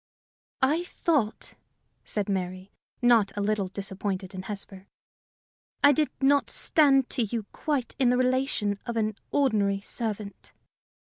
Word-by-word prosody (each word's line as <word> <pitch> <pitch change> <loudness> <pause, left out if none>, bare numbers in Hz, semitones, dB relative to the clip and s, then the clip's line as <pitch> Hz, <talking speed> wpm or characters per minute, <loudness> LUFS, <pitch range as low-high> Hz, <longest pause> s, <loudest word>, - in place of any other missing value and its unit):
"I 305 +6 +3
thought," 290 -11 -1 0.5
said 205 -2 -2
Mary, 185 0 -3 0.3
not 235 -4 +5
a - - 0
little 205 -1 0
disappointed 195 0 -4
in 185 - -5
Hesper, 195 -1 -6 1.0
"I 285 - +8
did 300 +1 +2
not 280 +1 +3
stand 275 -4 +3
to 255 - 0
you 225 0 -2
quite 285 -5 -2
in 255 -3 +4
the 250 - +3
relation 255 -5 +1
of 235 -1 -3
an 215 -1 0
ordinary 210 -8 +2
servant." 210 -1 -4
215 Hz, 130 wpm, -27 LUFS, 200-265 Hz, 1.0 s, I